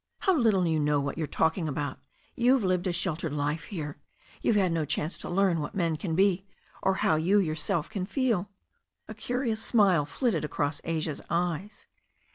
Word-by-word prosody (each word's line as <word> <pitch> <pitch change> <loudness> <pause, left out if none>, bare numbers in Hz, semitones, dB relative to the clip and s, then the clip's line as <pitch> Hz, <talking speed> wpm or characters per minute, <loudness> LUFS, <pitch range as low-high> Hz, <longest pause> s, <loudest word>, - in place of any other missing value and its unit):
"How 380 -3 +3
little 220 - +3
you 160 -2 +1
know 150 -1 +2
what 140 +3 -3
you 160 - 0
are - - -10
talking 160 +2 0
about. 145 -1 -3 0.4
You've 250 0 +3
lived 185 -1 +1
a - - +1
sheltered 170 -3 -1
life 150 +1 -1
here. 150 -7 -6 0.4
You've 225 - +2
had 190 -4 +3
no 165 -1 0
chance 150 +2 -1
to - - -6
learn 185 -2 +2
what 150 - -5
men 170 -4 +1
can 160 +1 -3
be, 195 +1 +2 0.3
or 190 - +2
how 155 - +4
you 180 +6 +3
yourself 160 -3 0
can 195 -4 -4
feel." 215 -4 0 0.6
A - - -7
curious 245 -3 -2
smile 190 - +4
flitted 240 - 0
across 145 -1 -2
Asia's 160 -2 -2
eyes. 175 +3 -2
175 Hz, 185 wpm, -28 LUFS, 155-200 Hz, 0.6 s, how